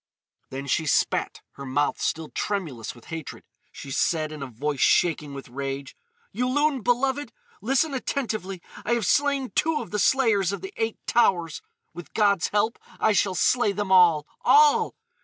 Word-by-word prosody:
Then 135 +1 -6
she 155 +3 0
spat, - - 0
her 140 - -10
mouth 145 +3 0
still 160 -1 -2
tremulous 155 - -4
with 120 - -17
hatred. 160 -4 -7 0.3
She 140 - -9
said 155 +2 0
in 155 -2 -8
a 135 - -4
voice 135 +4 -4
shaking 150 -4 +2
with 135 - -8
rage: 135 +2 -5 0.4
"Yulun, 265 +3 0
beloved! 265 +5 0 0.3
Listen 275 +3 +1
attentively. 215 -9 -3 0.2
I - - 0
have 235 -4 0
slain 280 +3 +1
two 315 -1 +1
of 230 - -8
the 210 - -1
Slayers 210 -7 +3
of 200 -3 -5
the 190 - -8
Eight 225 -1 -2
Towers. 175 -9 +1 0.3
With 175 -3 -11
God's 200 -4 +3
help 210 +2 0 0.2
I 220 - +3
shall 195 -2 +1
slay 215 +3 +2
them 205 -1 -3
all—all! 180 - +4
195 Hz, 160 wpm, -25 LUFS, 150-245 Hz, 0.4 s, all—all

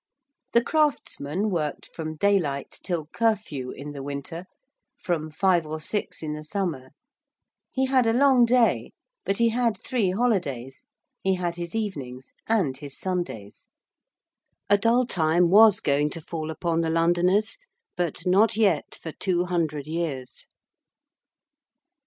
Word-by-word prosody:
The 235 - +5
craftsman 215 - 0
worked 155 -5 -2
from 155 -1 -5
daylight 160 -7 0
till 170 -4 -2
curfew 205 - 0
in 145 +3 -7
the 140 -1 -7
winter: 145 +5 -6 0.5
from 170 - -2
five 175 +2 +2
or 155 +1 -4
six 205 +1 -3
in 150 -1 -3
the 150 0 -6
summer: 155 -7 -3 0.8
he 265 0 0
had 260 -3 +3
a - - +4
long 255 0 +5
day: 240 -1 +2 0.3
but 195 - 0
he 235 0 +4
had 230 -2 +1
three 230 -7 +1
holidays: 180 - -1 0.4
he 190 0 +2
had 175 -2 -2
his 170 +3 -6
evenings: 140 - -5
and 190 -12 +1
his 140 -2 -8
Sundays. 175 - -4 1.0
A 205 - +7
dull 235 +4 +3
time 170 -4 +2
was 210 0 +7
going 145 +1 +1
to 165 - -7
fall 155 0 -5
upon 165 +1 -1
the 165 - 0
Londoners, 175 - +2 0.4
but 175 -1 -2
not 200 +5 +4
yet 195 -9 +1
for 160 - -5
two 180 +1 0
hundred 160 -5 -1
years. 155 -5 -4
175 Hz, 140 wpm, -25 LUFS, 150-215 Hz, 1.0 s, A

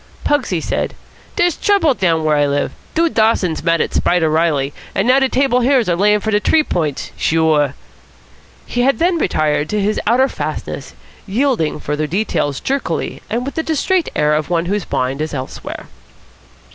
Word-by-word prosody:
Pugsy 260 - 0
said: - - -2 0.4
"Dere's 350 -3 +2
trouble 395 -8 +2
down 170 -7 +1
where 155 -1 +2
I 145 -1 +2
live. 145 0 -1 0.2
Dude 335 0 +2
Dawson's 220 -7 +2
mad 165 -1 +2
at - - -2
Spider 170 -3 +2
Reilly, 150 -4 +1 0.2
an' 195 - +1
now 255 +2 +5
de 265 -1 +2
Table 260 -1 +2
Hills 250 -3 +2
are 175 - +2
layin' 210 +3 +3
for 220 - -2
de 205 - +3
T'ree 310 +8 +3
Points. 155 - -2
Sure." 155 -4 +2 0.9
He 245 - -2
had 270 +2 +2
then 345 0 +1
retired 150 - 0
to 210 - 0
his 205 +2 0
outer 250 +4 +4
fastness, - - -5 0.3
yielding 215 - 0
further 150 +1 -2
details 155 -6 -1
jerkily 265 -11 -2
and 235 +4 -2
with 280 - -4
the 320 - -1
distrait 325 +3 0
air 150 0 +2
of 150 +1 -1
one 170 -1 0
whose 200 +2 -2
mind 130 +3 -1
is 155 -1 -3
elsewhere. 130 -1 -6
195 Hz, 175 wpm, -17 LUFS, -, 0.9 s, now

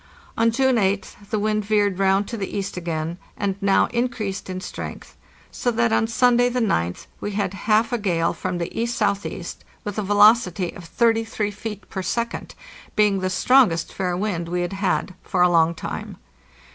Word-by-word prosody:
On 230 0 +3
June 260 +2 +2
8th 200 0 -1
the 215 - 0
wind 215 0 0
veered 205 -2 +1
round 195 +1 +3
to 235 - -5
the 200 -4 -4
east 195 -1 -3
again, 170 -1 -3 0.2
and 200 -2 -1
now 200 -1 +4
in 240 +1 +1
creased 205 -6 -5
in 185 0 -3
strength, - - -7 0.4
so 245 - -1
that 235 -1 +1
on 225 - +2
Sunday, 245 +1 +3
the 250 +1 -1
goth, 90 - 0
we 205 - -4
had 200 -2 -1 0.2
half 220 +3 +3
a 240 - +1
gale 170 -5 +1
from 185 -1 -3
the 170 -1 -4
E.S.E., 205 -6 -1 0.4
with 205 0 -4
a - - +1
velocity 205 -3 +4
of 175 - -11
33 225 0 +1
feet 210 0 -7
per 190 - -4
second, 235 +4 -3 0.4
being 205 -2 +3
the 185 0 -1
strongest 190 -2 +3
fair 180 -2 -1
wind 180 -4 -2
we 180 0 -1
had 175 +2 -2
had 195 -1 -1
fora 180 -2 +2
long 170 -1 +3
time. - - -6
200 Hz, 180 wpm, -23 LUFS, 185-225 Hz, 0.4 s, now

